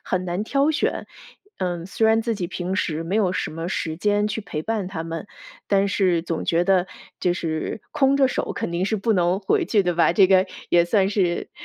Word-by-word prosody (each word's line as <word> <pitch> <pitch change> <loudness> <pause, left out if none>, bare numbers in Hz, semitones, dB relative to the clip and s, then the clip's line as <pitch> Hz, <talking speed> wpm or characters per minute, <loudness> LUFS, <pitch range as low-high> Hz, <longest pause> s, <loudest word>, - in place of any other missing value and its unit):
很 185 0 -1
难 180 +3 -2
挑 280 +5 +2
选。 310 - -1 0.6
嗯， 175 -2 -2
虽 220 +4 +1
然 225 0 +3
自 230 0 -1
己 185 -4 -3
平 180 +2 -4
时 160 -4 -1
没 180 +6 -2
有 195 -5 +2
什 185 - -2
么 165 +2 -5
时 160 -4 -2
间 205 +4 +1
去 215 +1 -3
陪 155 -7 -5
伴 215 -4 -2
他 165 -4 -5
们， 165 +3 -5 0.4
但 200 0 +3
是 185 -4 +1
总 165 -1 -3
觉 170 +1 +2
得 185 -1 +3 0.3
就 175 -1 +1
是 160 +3 -3
空 275 -2 +3
着 275 - +4
手 - - -3
肯 170 - -3
定 175 +3 0
是 220 - 0
不 220 +3 +1
能 180 0 +2
回 405 - +1
去 210 -3 +3
的 180 -1 0
吧， 165 0 +4
这 190 +1 +6
个 190 0 +4 0.2
也 170 0 +4
算 195 +1 +2
是 180 -4 0
185 Hz, 235 characters per minute, -23 LUFS, 175-210 Hz, 0.6 s, 这